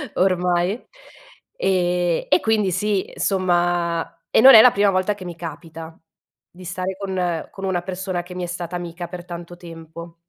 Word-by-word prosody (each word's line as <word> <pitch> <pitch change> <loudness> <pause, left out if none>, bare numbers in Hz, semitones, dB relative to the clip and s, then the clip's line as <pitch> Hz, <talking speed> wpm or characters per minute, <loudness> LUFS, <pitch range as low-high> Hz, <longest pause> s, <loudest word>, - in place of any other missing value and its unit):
ormai. 180 +2 +1 0.7
Ehm, 180 - 0
e 185 - +5
quindi 215 -4 +1
sì, 195 +2 -1
insomma, 175 -3 0
e - - +4
non 265 +3 +10
è 220 - +11
la 250 - +7
prima 200 -1 +2
volta 185 +2 0
che 190 -2 -10
mi 175 -1 -7
capita, 165 0 -9 0.5
di 180 +1 -14
stare 185 +2 -4
con 185 -4 -2
con 195 - -7
una 185 -2 -1
persona 185 0 -4
che 180 +1 -11
mi 180 - -4
è - - -1
stata 175 0 -5
amica 175 0 -6
per 175 0 -9
tanto 175 -1 -8
tempo. 165 -1 -11
180 Hz, 170 wpm, -21 LUFS, 175-190 Hz, 0.7 s, è